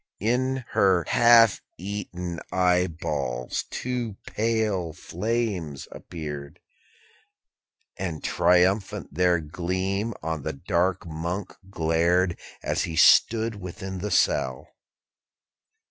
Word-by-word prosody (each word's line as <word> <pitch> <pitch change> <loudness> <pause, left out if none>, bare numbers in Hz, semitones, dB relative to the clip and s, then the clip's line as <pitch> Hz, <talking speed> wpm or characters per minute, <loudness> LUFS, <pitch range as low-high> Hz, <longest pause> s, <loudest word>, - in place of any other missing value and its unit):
In 130 +4 0
her 95 -3 +3
half 115 -2 +6 0.2
eaten 90 -3 -5
eyeballs 80 -9 0
two 120 -4 -3
pale 110 -7 -1
flames 95 - -3
appeared, 75 -4 -7 1.4
And 85 -5 -4
triumphant 90 +1 +2
their 90 +1 +3
gleam 95 +7 -2
on 80 -1 -2
the - - -3
dark 90 +5 0
Monk 85 +4 -4
glared, 85 +1 +2 0.3
As - - 0
he 80 - -5
stood 110 +5 +4
within 95 +1 -6
the 105 +3 -3
cell. 65 -9 +1
90 Hz, 90 wpm, -25 LUFS, 80-105 Hz, 1.4 s, half